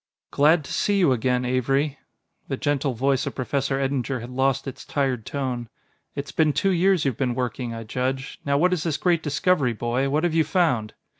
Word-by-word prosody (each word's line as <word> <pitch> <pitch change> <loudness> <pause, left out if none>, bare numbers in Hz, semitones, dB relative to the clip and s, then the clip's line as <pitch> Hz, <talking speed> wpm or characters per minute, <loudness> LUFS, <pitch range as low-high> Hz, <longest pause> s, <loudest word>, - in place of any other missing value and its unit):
"Glad 155 +3 +4
to - - -7
see 205 -1 +1
you 175 -8 +4
again, 125 +1 +1
Avery." 135 +3 0 0.5
The - - -3
gentle 145 -2 0
voice 135 +2 +1
of - - -5
Professor 135 +1 -1
Eddinger 135 -1 -1
had 120 +2 -8
lost 135 +1 0
its 135 - -7
tired 130 -6 -1
tone. 125 -4 -3 0.5
"It's 140 0 -5
been 155 -2 +2
two 195 +8 +1
years 185 -2 +3
you've 130 -5 0
been 125 -3 0
working, 125 -1 -3
I 115 - -6
judge. 130 +4 -3
Now 140 0 +1
what 180 +4 +3
is 175 - -1
this 155 -3 -1
great 170 0 +2
discovery, 145 -3 +1
boy? 120 +4 -1
What 150 +4 +1
have 175 -2 +1
you 160 -1 +4
found?" 155 - 0
135 Hz, 200 wpm, -24 LUFS, 125-155 Hz, 0.5 s, Glad